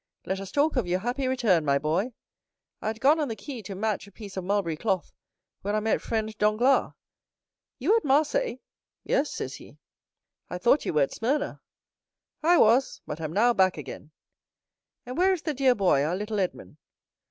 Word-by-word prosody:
Let 190 0 -2
us 195 -1 -7
talk 290 0 +1
of 230 -8 0
your 180 +1 +1
happy 250 +4 -2
return, 225 -10 +2
my 140 -1 +2
boy. 165 - -1 0.7
I - - -4
had 220 0 -3
gone 295 +6 +4
on 300 - 0
the 225 - -4
quay 230 +4 -7
to 195 -1 -7
match 210 0 -2
a - - -15
piece 200 -1 -10
of 190 - -3
mulberry 190 -4 0
cloth, 190 +1 -2 0.5
when 205 +2 -2
I - - +2
met 220 +1 0
friend 220 -1 -2
Danglars. 215 +6 +3 0.8
'You 340 - +3
at 460 - +1
Marseilles?'—'Yes,' 300 - -1
says - - -5
he. - - -15 0.7
"'I 180 - -4
thought 235 +10 +3
you - - -1
were 150 -2 +4
at 135 - -3
Smyrna.'—'I 300 +5 -3
was; 240 +3 +4
but 155 +2 -6
am 155 -1 -3
now 240 +5 +4
back 185 -5 +3
again.' 150 0 -8 1.0
"'And 250 +6 -5
where 380 +1 +4
is 350 - -4
the 310 - -1
dear 265 -2 +3
boy, 180 -9 +3
our 160 +4 0
little 210 +2 -3
Edmond? 180 -5 -4
220 Hz, 185 wpm, -27 LUFS, 190-270 Hz, 1.0 s, gone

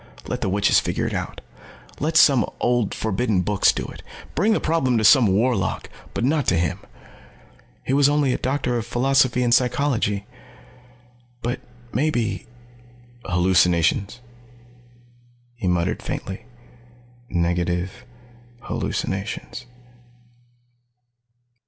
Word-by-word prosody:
Let - - -4
the - - 0
witches 100 +2 +3
figure - - -2
it - - -2
out. - - -4 0.6
Let 160 +2 +1
some 135 -7 +6 0.2
old 120 -3 +1
forbidden 110 -2 0
books 105 +2 +3
do - - -4
it. - - -10 0.3
Bring 210 +8 +2
the - - +1
problem 135 -7 +1
to 110 - +1
some 120 +2 +7
warlock. 100 0 0 0.2
But - - -1
not 145 +1 +1
to 90 - +3
him. 80 -2 -1 1.0
He 130 - -2
was 140 0 +5
only 145 -3 +2
a - - -2
Doctor 130 -2 -1
of 115 - -5
Philosophy 125 0 +2
in 120 - +1
Psychology. 120 -5 +1 1.2
But 120 +1 -2 0.3
maybe 120 - -1 0.8
"Hallucinations," 90 +4 +2 1.3
he 120 -6 -4
muttered 90 -1 0
faintly. 95 - -5 0.8
"Negative 85 +1 -1 0.6
hallucinations." 105 +5 -4
120 Hz, 110 wpm, -22 LUFS, 95-130 Hz, 1.3 s, some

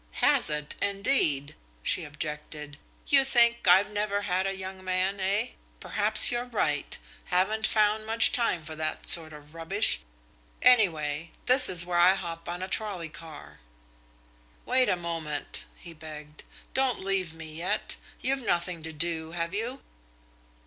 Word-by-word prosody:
"Has - - +2
it 150 0 -2
indeed!" 195 - 0 0.3
she 175 - 0
objected. 150 0 -8 0.3
"You 275 -1 +4
think 235 -4 +3
I've 190 +4 +4
never 205 -1 -2
had 185 0 -1
a 195 0 -4
young 190 0 -8
man, 185 +2 -2
eh? 200 +5 -1 0.3
Perhaps 215 +2 +6
you're 240 0 -3
right. 150 - -2 0.3
Haven't 215 +5 0
found 215 0 0
much 225 +1 +7
time 230 -10 0
for 155 - -7
that 155 0 -4
sort 160 -2 +5
of 150 0 -15
rubbish. 180 +6 0 0.6
Anyway, 165 -10 +2 0.2
this 255 +1 +7
is 175 -2 +4
where 175 -1 -1
I 180 +2 +5
hop 165 -3 -7
on 175 +1 -5
a - - -4
trolley 190 -4 -4
car." 155 0 -12 1.1
"Wait 255 0 +2
a - - +2
moment," 165 -4 -5
he 170 -2 -12
begged. 150 -1 -11 0.3
"Don't 265 -3 0
leave 190 -4 -2
me 160 -1 -10
yet. 170 +3 -3 0.2
You've 270 +1 -1
nothing 175 -5 -2
to 160 0 -6
do, 160 0 -2
have 170 +1 -4
you?" 235 +6 -4
180 Hz, 150 wpm, -26 LUFS, 160-210 Hz, 1.1 s, much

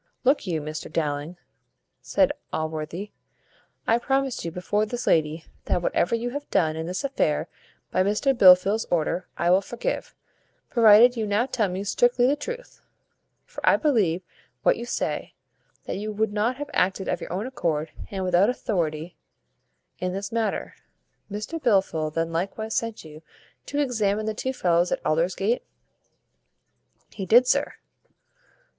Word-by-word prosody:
"Look 270 -4 +2
you, 165 -4 -1
Mr 155 +1 -6
Dowling," 150 +2 -2 0.6
said - - +2 0.2
Allworthy; 160 +5 -4 0.7
"I 230 +1 +3
promise 270 +1 0
you 170 - -3
before 180 +5 -1
this 240 +3 -4
lady, 160 +1 +1 0.2
that 175 - 0
whatever 175 +5 +1
you 240 +1 -3
have 285 +2 -6
done 155 -2 +2
in 160 +1 -4
this 185 +7 -3
affair 275 0 0 0.4
by 185 - +2
Mr 210 +8 +2
Blifil's 195 +1 +6
order 175 +1 0
I 170 +1 +2
will 185 +2 +5
forgive, 235 +4 -4 0.6
provided 235 +1 +7
you 220 -2 -2
now 205 +4 +2
tell 230 -6 0
me 185 +2 -3
strictly 245 +4 +2
the 275 +3 +3
truth; 485 +10 -8 0.6
for - - -10
I - - +6
believe 200 - +1 0.4
what - - +4
you 235 - -7
say, - - -3 0.5
that - - -4
you 215 +2 -4
would 215 0 -1
not 220 +4 +1
have 290 +2 -7
acted 190 +1 +1
of 180 - -1
your - - -7
own 190 +5 -2
accord 160 - -2 0.2
and 190 -2 -4
without 185 +3 +3
authority 170 -8 -2 0.8
in 180 0 -2
this 195 +1 -4
matter. 225 -3 -2 0.6
Mr 215 +11 -5
Blifil 190 - +2
then 165 +1 -1
likewise 200 +6 -3
sent 230 -6 -2
you 155 0 -11 0.5
to 285 - -4
examine 215 -7 0
the 220 - -1
two 260 +5 -2
fellows 175 -7 +1
at - - -2
Aldersgate?" 185 +8 +1 1.5
"He 195 -2 -6
did, 240 +6 +7
sir." 285 +3 +1
200 Hz, 150 wpm, -25 LUFS, 170-240 Hz, 1.5 s, provided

